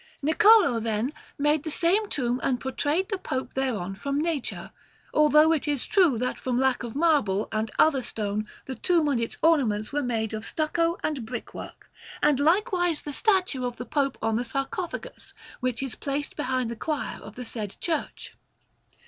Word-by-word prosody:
Niccolò, 345 - +6
then, 225 +5 -1 0.2
made 295 +1 +2
the 315 - -5
said 375 +7 +1
tomb 245 -2 0
and 250 -2 0
portrayed 290 - -1
that 390 -3 -3
Pope 260 0 -3
thereon 225 -9 -1
from 280 +8 -2
nature; 315 -4 -2 0.4
although 300 +1 +6
it 315 -2 0
is 290 -3 0
true 360 - +4
that 250 +2 -2
from 250 -2 -1
lack 265 -1 +2
of 235 0 -6
marble 280 - +2
and 220 0 -1
other 290 -4 +4
stone 215 -2 -3 0.2
the 265 - -5
tomb 335 +2 +2
and 250 -5 +1
its 230 - -4
ornaments 250 -10 +2
were 290 - +1
made 225 -4 -2
of 215 0 -4
stucco 330 +5 0
and 290 -6 -1
brick 240 +2 -6
work, - - -10 0.3
and 295 -2 +3
likewise 350 0 +2
the 295 - -5
statue 370 - +1
of 245 -1 -3
the 245 - -6
Pope 275 +1 0
on 225 0 +1
the 240 - 0
sarcophagus, 275 +8 -5 0.2
which 255 0 -2
is 265 -4 -4
placed 285 +3 -3
behind 255 -4 -1
the - - -4
choir 300 +5 -3
of 210 - -11
the 250 - -6
said 215 -3 -5
church. 325 -3 -3
275 Hz, 180 wpm, -26 LUFS, 235-315 Hz, 0.4 s, Niccolò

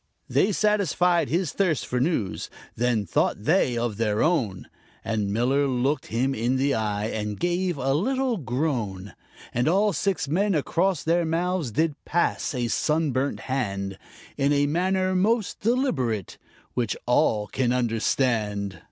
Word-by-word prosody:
They 210 - +2
satisfied 180 -4 +2
his 170 -2 0
thirst 175 -8 0
for 125 - -1
news, 125 - -1 0.3
then 120 -3 +1
thought 95 +4 0
they 140 - +2
of 115 -3 -2
their 105 -2 +1
own, 130 - 0 0.4
And 105 -3 -1
Miller 130 +6 +2
looked 135 +3 0
him 130 +4 0
in 120 +2 0
the 135 +1 +1
eye 105 -1 -1
and 105 -2 -4
gave 175 -1 0
a 135 0 0
little 255 - 0
groan, 120 - -2 0.4
And 120 +4 +1
all 200 +5 +3
six 185 -5 -1
men 190 +6 +1
across 170 +3 0
their 170 +2 +2
mouths 170 -2 -1
did 155 +7 +1
pass 170 -4 0
a 120 -1 0
sun 155 +5 +1
burnt 130 +3 -1
hand 100 -7 -3 0.4
In 140 +1 +2
a 145 0 +3
manner 185 +4 +1
most 210 +3 +1
deliberate, 165 - -1 0.3
which 120 -4 -1
all 120 -4 +2
can 120 +4 -1
understand. 110 -5 0
135 Hz, 145 wpm, -25 LUFS, 115-175 Hz, 0.4 s, all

